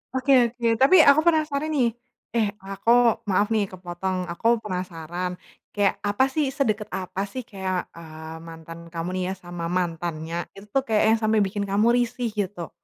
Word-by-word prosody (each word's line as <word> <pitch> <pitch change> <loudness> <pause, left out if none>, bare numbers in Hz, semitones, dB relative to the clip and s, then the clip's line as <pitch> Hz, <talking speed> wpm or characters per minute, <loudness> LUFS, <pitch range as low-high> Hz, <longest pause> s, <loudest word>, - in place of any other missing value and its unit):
Oke 260 +2 +1 0.2
oke, 235 -1 -2
tapi 300 +8 +7
aku 280 - +6
penasaran 310 -2 +2
nih, 255 -6 +2 0.5
eh, 225 -2 +3 0.2
aku 195 +4 0 0.4
maaf 205 +2 +3
nih 215 - +2
kepotong, 185 +1 -4
aku 230 +6 +2
penasaran 180 -2 -4 0.4
kayak 205 -2 +2
apa 205 +5 +2
sih, 305 -2 +1
sedekat 215 -6 0
apa 185 +1 -4
sih, 255 - -4
kayak, 190 -3 -3
eee, 160 -1 -9
mantan 165 0 -10
kamu 165 +1 -3
nih 185 - -1
ya - - -2
sama 175 -1 -6
mantannya 165 -2 -3 0.2
itu 200 +1 -12
tuh 270 - +2
kayaknya 215 -1 +3
yang 225 - +3
sampai 215 0 +3
bikin 200 +1 -3
kamu 210 +3 +3
risih 245 0 0
gitu? 185 -4 -3
195 Hz, 170 wpm, -24 LUFS, 175-235 Hz, 0.5 s, tapi